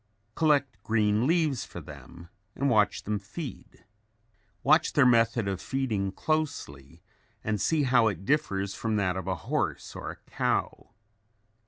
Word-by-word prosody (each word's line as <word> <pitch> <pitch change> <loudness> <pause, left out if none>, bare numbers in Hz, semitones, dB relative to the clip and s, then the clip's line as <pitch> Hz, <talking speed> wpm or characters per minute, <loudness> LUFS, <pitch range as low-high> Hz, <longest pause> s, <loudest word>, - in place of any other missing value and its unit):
Collect 140 - +1
green 110 +2 +2
leaves 160 -6 +2
for - - -9
them 85 0 -12 0.3
and 140 0 +1
watch 105 -2 +2
them 105 -1 -2
feed. 110 - -9 0.8
Watch - - +4
their 140 - +5
method 115 -3 +3
of 95 -2 -2
feeding 110 -8 -1
closely 90 - -3 0.4
and 105 -3 -1
see 155 +7 +2
how 125 -3 +4
it 95 -3 -3
differs 100 -10 0
from 110 -1 -2
that 95 -3 +1
of 95 0 -5
a 95 - 0
horse - - -2
or - - -5
a - - -6 0.2
cow. - - -1
110 Hz, 145 wpm, -28 LUFS, 100-135 Hz, 0.8 s, their